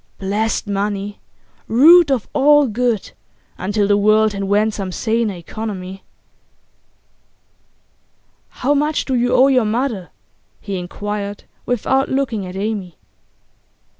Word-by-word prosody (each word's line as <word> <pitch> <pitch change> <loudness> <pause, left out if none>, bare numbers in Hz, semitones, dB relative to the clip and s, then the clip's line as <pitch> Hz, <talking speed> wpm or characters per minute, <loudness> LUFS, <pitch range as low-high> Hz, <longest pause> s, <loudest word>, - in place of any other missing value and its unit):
Blessed 210 +3 -1
money! 205 0 -3 0.5
root 310 +7 +6
of 260 -6 0
all 295 +1 +5
good, 235 -2 -1 0.5
until 205 +2 0
the 205 - +3
world 215 +1 +3
invent 205 +2 0
some 195 -3 -4
saner 220 0 -1
economy. 190 0 -7 2.5
'How 275 +4 -1
much 295 +1 0
do 265 - -2
you 245 0 +1
owe 255 +1 +6
your 260 -3 +3
mother?' 220 -4 -2 0.5
he 195 -2 -5
inquired, 205 +3 -5 0.2
without 265 +3 0
looking 235 -8 -2
at 180 - -8
Amy. 195 -3 -4
215 Hz, 110 wpm, -18 LUFS, 200-250 Hz, 2.5 s, root